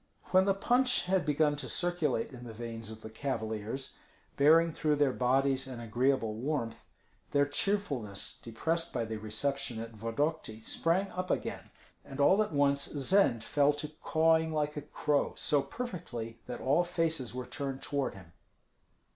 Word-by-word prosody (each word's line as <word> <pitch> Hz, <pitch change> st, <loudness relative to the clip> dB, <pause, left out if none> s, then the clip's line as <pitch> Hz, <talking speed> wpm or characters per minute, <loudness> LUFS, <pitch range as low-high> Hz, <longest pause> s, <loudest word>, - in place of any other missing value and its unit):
When 185 Hz, 0 st, +6 dB
the 195 Hz, -1 st, +3 dB
punch 250 Hz, +5 st, +2 dB
had 185 Hz, -2 st, +1 dB
begun 150 Hz, 0 st, +3 dB
to 145 Hz, -, -5 dB
circulate 175 Hz, -9 st, 0 dB
in 125 Hz, -2 st, -10 dB
the 115 Hz, -2 st, -8 dB
veins 115 Hz, -1 st, -6 dB
of 110 Hz, 0 st, -9 dB
the 110 Hz, -, -8 dB
cavaliers, 110 Hz, 0 st, -3 dB, 0.4 s
bearing 160 Hz, +3 st, +5 dB
through 150 Hz, -1 st, +1 dB
their 145 Hz, -3 st, +3 dB
bodies 130 Hz, +1 st, +2 dB
an 125 Hz, -2 st, -7 dB
agreeable 120 Hz, 0 st, +1 dB
warmth, 115 Hz, -1 st, -3 dB, 0.5 s
their 145 Hz, 0 st, +5 dB
cheerfulness, 145 Hz, -, -2 dB
depressed 165 Hz, +9 st, -2 dB
by 120 Hz, -2 st, -1 dB
the 110 Hz, 0 st, -4 dB
reception 115 Hz, +3 st, -2 dB
at 115 Hz, 0 st, -6 dB
Vodokty, 115 Hz, +2 st, -2 dB
sprang 170 Hz, -, 0 dB
up 185 Hz, 0 st, -4 dB
again; -, -, -2 dB, 0.3 s
and 135 Hz, -, -9 dB
all 190 Hz, +9 st, +5 dB
at 210 Hz, -, -1 dB
once 140 Hz, -1 st, +2 dB
Zend 145 Hz, -, +2 dB
fell 145 Hz, +3 st, +3 dB
to 145 Hz, +1 st, -4 dB
cawing 160 Hz, 0 st, +3 dB
like 150 Hz, -1 st, -1 dB
a 150 Hz, -, -3 dB
crow, 150 Hz, 0 st, 0 dB
so 145 Hz, -2 st, +2 dB
perfectly 135 Hz, -, -6 dB
that 125 Hz, -, -5 dB
all 145 Hz, +7 st, +3 dB
faces 165 Hz, -8 st, -1 dB
were 125 Hz, -1 st, -4 dB
turned 135 Hz, -1 st, -5 dB
toward 140 Hz, -6 st, -1 dB
him. 85 Hz, -4 st, -14 dB
140 Hz, 160 wpm, -31 LUFS, 115-160 Hz, 0.5 s, When